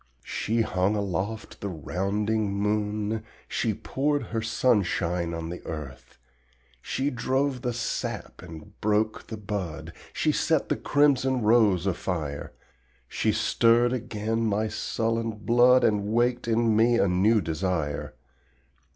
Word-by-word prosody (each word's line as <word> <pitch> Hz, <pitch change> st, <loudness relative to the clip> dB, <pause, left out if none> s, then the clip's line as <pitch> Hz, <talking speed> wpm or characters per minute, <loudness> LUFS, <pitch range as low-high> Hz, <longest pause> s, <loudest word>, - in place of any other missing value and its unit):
She 115 Hz, +2 st, -1 dB
hung 95 Hz, -1 st, +1 dB
aloft 100 Hz, +2 st, -3 dB
the 100 Hz, -, -3 dB
rounding 100 Hz, +5 st, -1 dB
moon, 105 Hz, +1 st, -1 dB, 0.2 s
She 110 Hz, -3 st, -1 dB
poured 145 Hz, +6 st, -1 dB
her 115 Hz, -1 st, -3 dB
sunshine 95 Hz, -7 st, +1 dB
on 85 Hz, -1 st, -4 dB
the 90 Hz, -, -7 dB
earth, 65 Hz, -5 st, -8 dB, 0.6 s
She 135 Hz, -, -1 dB
drove 130 Hz, +2 st, 0 dB
the 125 Hz, -2 st, -1 dB
sap 120 Hz, 0 st, -4 dB
and 90 Hz, +3 st, -12 dB
broke 105 Hz, +1 st, 0 dB
the 110 Hz, -, -6 dB
bud, 100 Hz, -6 st, -5 dB, 0.2 s
She -, -, +1 dB
set -, -, +1 dB
the -, -, +2 dB
crimson 135 Hz, -4 st, +2 dB
rose 105 Hz, -5 st, +4 dB
afire. 85 Hz, -6 st, -3 dB, 0.6 s
She -, -, 0 dB
stirred 120 Hz, +1 st, +3 dB
again 115 Hz, -1 st, -2 dB
my 110 Hz, 0 st, +1 dB
sullen 115 Hz, 0 st, -1 dB
blood, 120 Hz, +4 st, +4 dB
And 105 Hz, -2 st, +2 dB
waked 120 Hz, +2 st, +1 dB
in 115 Hz, -1 st, +2 dB
me 115 Hz, +2 st, +4 dB
a 100 Hz, -, +3 dB
new 100 Hz, +5 st, +3 dB
desire. 80 Hz, -3 st, -2 dB
105 Hz, 125 wpm, -26 LUFS, 95-115 Hz, 0.6 s, rose